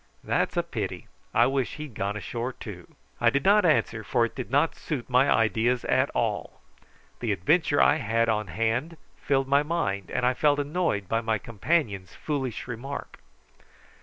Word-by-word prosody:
That's - - 0
a - - +3
pity. - - -5 0.2
I - - +4
wish 135 -2 -1
he'd 150 -4 -8
gone 100 0 -2
ashore 120 +4 -4
too." 90 -8 -10 0.2
I 120 - +5
did 140 +3 -1
not 205 0 +5
answer, 115 -7 +1
for 120 +2 +2
it 115 - -6
did 130 - -6
not 145 +5 +2
suit 140 -7 -5
my 130 +2 +4
ideas 115 +2 +2
at - - +2
all. - - -2 0.6
The 120 -3 -1
adventure 145 - +2
I - - +5
had 115 +2 +1
on 110 -2 0
hand 115 - -1 0.2
filled 135 -1 +1
my 140 +1 +4
mind, 145 - -2
and 125 - -1
I 125 - +3
felt 145 +2 +2
annoyed 145 - -1
by 115 +4 0
my 110 -1 0
companion's 105 - -1
foolish 135 -7 -3
remark. 135 +4 -6
125 Hz, 170 wpm, -27 LUFS, 110-145 Hz, 0.6 s, I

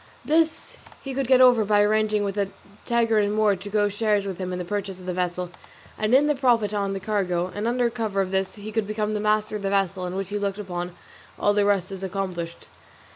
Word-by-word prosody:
This 320 +1 +1
however - - -20
he 270 - -5
could 270 -1 -1
get 255 0 +6
over 245 -3 +6
by 205 0 +4
arranging 215 0 +2
with 200 -1 -2
a 200 -2 0 0.4
Tagarin 225 -3 +2
Moor 215 -2 +3
to 195 +2 -8
go 205 0 +2
shares 205 0 0
with 195 -2 -5
him 185 -1 -3
in 180 - -3
the 180 - -4
purchase 195 0 -3
of 185 - -11
the 180 - -2
vessel, 180 0 -2 0.4
and 215 +3 +2
in 280 +2 +5
the 295 - +3
profit 240 -6 +2
on 200 -1 -1
the 195 - -3
cargo; 185 -3 -1
and 210 +2 -2
under 245 0 +2
cover 220 -4 -2
of 190 -1 0
this 190 0 -1
he 210 0 -8
could 220 -1 -1
become 215 0 -1
master 215 0 +1
of - - -9
the 195 - -1
vessel, 195 -2 0
in 180 - -5
which 195 -1 -3
case 205 - -2
he - - -5
looked 200 -1 -1
upon 175 -3 -5 0.4
all 205 - +2
the 205 0 +2
rest 195 -2 +1
as 190 -1 -6
accomplished. 185 -3 -4
205 Hz, 240 wpm, -24 LUFS, 190-215 Hz, 0.4 s, get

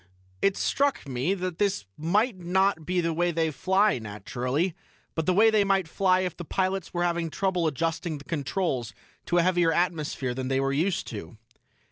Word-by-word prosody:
"It 195 -1 +2
struck 280 - 0
me 135 +9 0
that 180 -2 -4
this 200 - +1
might 200 +9 +1
not 180 -2 +1
be 180 0 +1
the 165 -1 0
way 175 +2 +1
they 165 -1 0
fly, 190 +2 +2
naturally, 125 - -2 0.4
but 160 -1 -2
the 185 - +4
way 220 +3 +6
they 215 -2 +4
might 195 -3 +1
fly 185 +2 +2
if 180 -3 -2
the 175 - -7
pilots 190 +2 -1
were 175 -1 -1
having 170 -1 0
trouble 180 -1 0
adjusting 160 +1 -2
the 140 - -11
controls 140 - -2 0.3
to 175 - +2
a 170 - +5
heavier 175 -2 +3
atmosphere 155 -7 -1
than 130 +1 -4
they 135 0 +1
were 135 0 0
used 170 +6 0
to." 100 -3 -8
170 Hz, 185 wpm, -27 LUFS, 150-190 Hz, 0.4 s, way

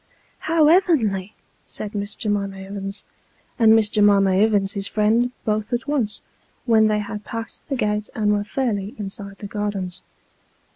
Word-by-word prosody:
" - - -37
How 320 -2 +5
ev'nly! 230 - +2 0.2
" - - -40
said 210 -1 -5
Miss 205 0 -3
J'mima 200 -2 -2
Ivins, 195 0 -6 0.5
and 225 -1 +7
Miss 220 -2 +4
J'mima 205 -2 +4
Ivins's 200 -1 +2
friend, 225 +3 +2
both 215 +1 -1
at 240 +3 -2
once, 255 -8 -1 0.4
when 220 -3 +5
they 215 0 +2
had 210 0 -5
passed 230 +6 -7
the 275 - 0
gate 210 -3 -1
and 210 -2 +1
were 205 0 0
fairly 210 -3 -2
inside 200 -1 -7
the - - -9
gardens. 200 -3 -3
210 Hz, 155 wpm, -22 LUFS, 200-225 Hz, 0.5 s, and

